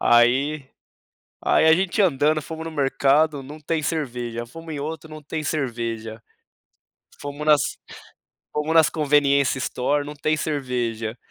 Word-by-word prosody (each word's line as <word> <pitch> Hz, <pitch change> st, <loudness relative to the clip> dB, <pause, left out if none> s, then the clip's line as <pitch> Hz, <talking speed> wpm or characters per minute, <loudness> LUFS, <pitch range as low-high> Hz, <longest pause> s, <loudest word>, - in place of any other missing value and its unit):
aí 130 Hz, +4 st, +3 dB, 0.7 s
aí -, -, +3 dB
a 160 Hz, -, +8 dB
gente 190 Hz, +4 st, +1 dB
andando, 155 Hz, -3 st, +2 dB
fomos 160 Hz, +2 st, -7 dB
no 165 Hz, -, -5 dB
mercado, 140 Hz, +1 st, +2 dB
não 150 Hz, +3 st, -10 dB
tem 155 Hz, +1 st, -1 dB
cerveja, 120 Hz, -7 st, -3 dB
fomos 165 Hz, +5 st, -9 dB
em 145 Hz, -, -4 dB
outro, 160 Hz, +1 st, -5 dB
não 155 Hz, 0 st, -9 dB
tem 155 Hz, +1 st, -4 dB
cerveja. 115 Hz, -6 st, -3 dB, 1.0 s
Fomos 145 Hz, +1 st, -6 dB
nas 150 Hz, -2 st, +6 dB, 0.9 s
fomos 150 Hz, +2 st, -1 dB
nas 160 Hz, -3 st, +6 dB
conveniência 140 Hz, -3 st, +2 dB
store, 140 Hz, +3 st, 0 dB
não 150 Hz, -, -7 dB
tem 155 Hz, +1 st, 0 dB
cerveja, 120 Hz, -7 st, -2 dB
145 Hz, 140 wpm, -23 LUFS, 130-155 Hz, 1.0 s, a